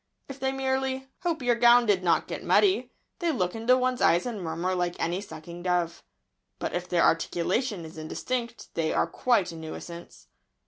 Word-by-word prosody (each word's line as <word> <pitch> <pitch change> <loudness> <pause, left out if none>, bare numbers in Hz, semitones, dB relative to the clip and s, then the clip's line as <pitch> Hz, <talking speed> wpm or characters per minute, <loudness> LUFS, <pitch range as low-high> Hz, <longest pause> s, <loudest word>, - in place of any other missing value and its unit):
If 275 0 -9
they 265 0 0
merely 265 0 -1
"hope 335 -6 -1
your 245 -1 +4
gown 240 +1 +6
did 200 -4 +3
not 170 -3 +3
get - - -5
muddy" 395 0 +3 0.3
they 345 -2 +1
look 180 - -1
into 230 +3 +3
one's 255 0 0
eyes 170 +1 +4
and 230 -5 -4
murmur 170 +2 -2
like 175 -1 -1
any 175 +3 -1
sucking 170 -2 -9
dove. 175 -2 0 0.6
But - - -4
if 175 0 -3
their 175 -1 +3
articulation 175 +4 +1
is 160 0 -10
indistinct 235 +9 -4
they 160 -1 0
are - - +2
quite 200 +1 +1
a - - -9
nuisance. 170 +2 -9
190 Hz, 180 wpm, -27 LUFS, 170-255 Hz, 0.6 s, gown